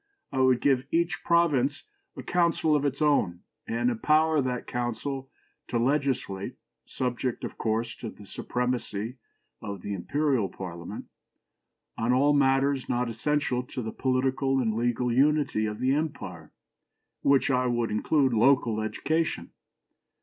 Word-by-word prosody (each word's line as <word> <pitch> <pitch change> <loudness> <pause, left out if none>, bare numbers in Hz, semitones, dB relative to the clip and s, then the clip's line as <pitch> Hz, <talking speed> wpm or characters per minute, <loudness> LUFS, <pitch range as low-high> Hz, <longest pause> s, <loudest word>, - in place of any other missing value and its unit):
I 135 - -2
would 130 -1 +4
give 135 -1 +2
each 170 +2 0
province 145 -5 +2 0.3
a - - -6
council 170 -3 +2
of 145 -1 +1
its 140 +1 0
own, 95 -13 +2 0.3
and 120 +2 +1
empower 155 +5 +3
that 125 -2 -2
council 125 +3 -3 0.4
to 120 - -1
legislate 130 -6 -1 0.3
(subject, 125 -1 -2
of - - -6
course, 115 +1 -1
to 115 - -6
the 105 - -13
supremacy 125 0 -3 0.4
of 100 -3 -6
the 100 - -3
Imperial 130 - 0
Parliament) 85 -3 -7 0.9
on 115 +2 +2
all 140 +3 +4
matters 135 -1 +2
not 120 0 0
essential 125 +2 0
to 125 0 -6
the 110 - -4
political 130 +1 +1
and 115 -4 +1
legal 120 +1 0
unity 140 -4 +2
of 105 0 -4
the 130 +3 +1
empire, 140 - -4 0.7
in - - +2
which 140 0 +4
I 125 0 +2
would 120 -2 0
include 130 +4 +2
local 115 -2 +3
education. 155 +9 -1
130 Hz, 140 wpm, -27 LUFS, 115-140 Hz, 0.9 s, would